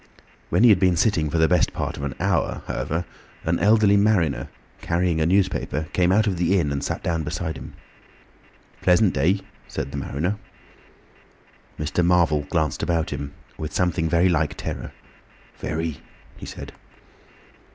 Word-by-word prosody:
When 90 +7 +3
he 120 - +8
had 100 -4 +6
been 90 -1 +3
sitting 85 -5 +2
for 80 - -1
the 80 0 +4
best 90 0 +2
part - - -3
of - - -7
an 70 -1 -3
hour, - - 0
however, 75 +7 -2 0.4
an 85 +1 0
elderly 105 +1 +5
mariner, 100 -9 +2 0.3
carrying 85 -1 0
a 80 - +2
newspaper, 90 -5 0
came 90 -1 +3
out 110 +3 +4
of 95 -4 0
the 90 +3 +2
inn 75 -4 0
and 70 -1 -2
sat - - -3
down 80 -1 0
beside 80 +1 -3
him. - - -9 1.1
"Pleasant 95 +2 +4
day," 95 +4 +2 0.3
said - - -4
the 70 - -5
mariner. 80 +9 -2 1.4
Mr. 75 +4 0
Marvel 85 -5 +3
glanced 80 -5 0
about 85 -2 0
him 70 0 -5 0.2
with 80 0 -5
something 85 -2 +1
very 85 +3 +4
like 80 -4 +1
terror. - - -5 0.7
"Very," 80 -1 -3 0.4
he - - -9
said. - - -8
85 Hz, 160 wpm, -23 LUFS, 80-90 Hz, 1.4 s, he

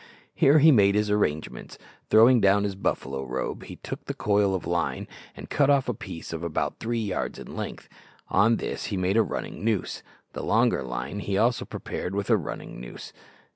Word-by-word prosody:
Here 140 +3 +5
he 155 +2 +7
made 100 -6 +5
his 105 0 +1
arrangements. 80 -7 -2 0.3
Throwing 115 +2 +6
down 100 +1 +4
his 100 -1 -1
buffalo 70 -8 -2
robe, 60 - -4
he - - -9
took - - -8
the - - -4
coil 100 -2 +2
of 95 - -4
line 85 -1 -1 0.3
and - - -8
cut 140 -1 +2
off 140 -2 +3
a 125 - 0
piece 95 -6 -8
of 80 - -4
about 85 -2 -2
three 120 +1 -2
yards 100 - -3
in - - -9
length. - - -6 0.4
On 115 +4 +4
this - - -4
he 100 - -3
made 95 +2 0
a 115 - +6
running 105 - -4
noose. 110 -4 -1 0.3
The - - -5
longer - - +2
line 60 +9 -4
he 100 -1 -2
also 115 +3 +2
prepared 90 +2 -5
with 100 +3 -1
a - - +7
running 80 -8 -7
noose. - - -9
100 Hz, 195 wpm, -26 LUFS, 90-115 Hz, 0.4 s, he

